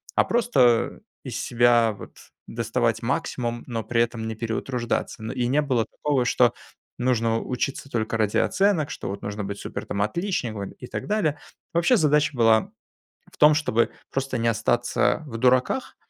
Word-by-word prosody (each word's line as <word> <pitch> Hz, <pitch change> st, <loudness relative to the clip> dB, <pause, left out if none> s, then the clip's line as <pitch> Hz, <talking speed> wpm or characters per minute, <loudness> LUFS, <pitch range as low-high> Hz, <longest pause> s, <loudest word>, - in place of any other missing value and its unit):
а -, -, +5 dB
просто 130 Hz, -, +2 dB, 0.2 s
из -, -, -5 dB
себя 120 Hz, -2 st, +3 dB
вот -, -, -12 dB, 0.3 s
доставать 115 Hz, 0 st, -1 dB
максимум, 120 Hz, -3 st, -2 dB
но 115 Hz, -2 st, -3 dB
при 115 Hz, +2 st, +1 dB
этом 115 Hz, -1 st, -2 dB
не 110 Hz, -, -4 dB
переутруждаться. 115 Hz, 0 st, -3 dB
Но 110 Hz, -, -4 dB
и 120 Hz, -, -1 dB
не 140 Hz, +4 st, +2 dB
было 130 Hz, -6 st, 0 dB
такого, 140 Hz, -4 st, -1 dB
что 120 Hz, -1 st, +3 dB, 0.5 s
нужно 115 Hz, -2 st, +1 dB
учиться 135 Hz, +2 st, -3 dB
только 115 Hz, -2 st, -1 dB
ради 105 Hz, -2 st, +1 dB
оценок, 195 Hz, -6 st, +2 dB
что -, -, -6 dB
вот 100 Hz, +1 st, -5 dB
нужно 100 Hz, +1 st, -4 dB
быть 100 Hz, 0 st, -5 dB
супер -, -, -6 dB
там 100 Hz, -, -3 dB
отличником 115 Hz, -, -3 dB
и 125 Hz, -, -11 dB
так -, -, -5 dB
далее. 175 Hz, -9 st, 0 dB, 0.3 s
Вообще, 170 Hz, +9 st, +4 dB
задача 150 Hz, -3 st, +3 dB
была 115 Hz, -2 st, +4 dB, 0.6 s
в -, -, -20 dB
том, 150 Hz, +1 st, +7 dB
чтобы 145 Hz, -7 st, +1 dB, 0.2 s
просто 135 Hz, -1 st, -2 dB
не 115 Hz, -, 0 dB
остаться 120 Hz, +6 st, +1 dB
в 115 Hz, -4 st, -6 dB
дураках 130 Hz, -, +1 dB
120 Hz, 165 wpm, -24 LUFS, 115-140 Hz, 0.6 s, том